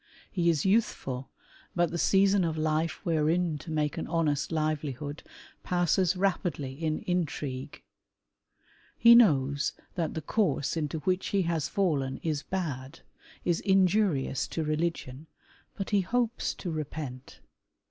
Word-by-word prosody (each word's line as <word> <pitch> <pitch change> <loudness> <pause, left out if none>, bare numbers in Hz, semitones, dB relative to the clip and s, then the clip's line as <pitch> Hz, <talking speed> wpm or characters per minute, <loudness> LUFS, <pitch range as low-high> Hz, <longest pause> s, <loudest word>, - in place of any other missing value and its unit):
He 170 -3 +2
is 160 -1 +1
youthful, 140 - 0 0.5
but 175 -2 +2
the 170 - -3
season 195 +1 +4
of 160 -2 -1
life 155 +1 -1
wherein 160 0 +1
to 150 - -10
make 150 -2 -1
an - - -4
honest 160 -3 0
livelihood 150 -2 -2 0.4
passes 180 +1 +1
rapidly 175 -8 -1
in 155 +2 -2
intrigue. 150 -6 -3 1.1
He 235 0 +8
knows 145 - +4 0.2
that 165 -3 -2
the 160 - -2
course 155 -8 0
into 155 0 -2
which 185 +2 0
he 195 -2 +1
has 165 -3 -1
Mien 140 -9 +1
is 155 -3 -1
bad, 150 -7 -4 0.4
is 170 -2 +2
injurious 190 -8 +2
to 160 - -3
religion, 155 -2 -2 0.5
but 195 0 -5
he 205 -2 +4
hopes 240 +4 -1
to 175 - -5
repent. 145 -4 -6
160 Hz, 130 wpm, -29 LUFS, 145-180 Hz, 1.1 s, He